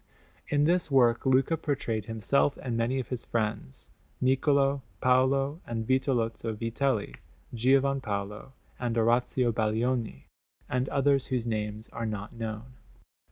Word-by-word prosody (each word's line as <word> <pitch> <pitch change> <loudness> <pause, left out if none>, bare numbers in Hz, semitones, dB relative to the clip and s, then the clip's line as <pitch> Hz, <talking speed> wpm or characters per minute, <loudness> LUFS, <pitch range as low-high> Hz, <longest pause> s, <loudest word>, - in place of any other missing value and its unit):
In 145 0 +2
this 170 +1 +2
work 125 -3 +3
Luca 130 +5 +3
portrayed 120 - -2
himself 115 +6 +1
and 125 -3 -2
many 115 +3 0
of 130 - -5
his 125 -2 -4
friends; 105 - -3 0.3
Niccolò, 135 +1 +2 0.2
Paolo, 135 +4 +2
and 115 -1 -3
Vitelozzo 120 -4 0
Vitelli, 115 0 -1 0.4
Giovan 135 +3 +2
Paolo 105 +3 -5 0.3
and 120 -2 -2
Orazio 120 +2 +2
Baglioni, 110 - -1 0.4
and 125 +1 -1
others 140 -1 +2
whose 125 -3 -1
names 110 -1 -3
are 115 -1 -4
not 105 0 -5
known. 115 +1 -6
125 Hz, 125 wpm, -28 LUFS, 115-135 Hz, 0.4 s, work